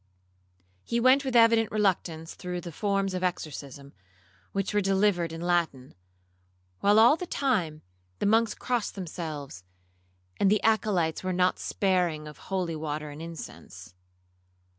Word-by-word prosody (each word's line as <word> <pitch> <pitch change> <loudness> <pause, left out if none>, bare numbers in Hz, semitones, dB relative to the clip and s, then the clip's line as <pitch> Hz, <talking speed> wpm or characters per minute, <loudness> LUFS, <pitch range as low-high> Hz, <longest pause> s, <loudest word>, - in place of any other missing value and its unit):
He 235 - -1
went 260 +3 +5
with 260 -2 -3
evident 230 -1 +5
reluctance 175 -6 -1
through 180 -1 -5
the 175 - -7
forms 195 +2 -1
of 185 0 -3
exorcism, 140 -5 -4 0.6
which 195 +1 -2
were 205 - +3
delivered 190 -3 +2
in 165 0 -7
Latin, 170 -7 -1 0.9
while 205 +1 +4
all 230 +6 +7
the 360 +2 -6
time, 185 - -1 0.3
the - - -2
monks 220 +1 +3
crossed 245 -4 -2
themselves, 155 - -6 0.7
and 200 - +3
the 210 0 +2
Acolytes 195 -8 +1
were 185 - -1
not 180 0 +2
sparing 175 -6 0
of 150 - -11
holy 180 -4 -1
water 150 -1 -4
and 145 +2 -9
of - - -5
incense. 155 - -10
185 Hz, 140 wpm, -28 LUFS, 160-210 Hz, 0.9 s, all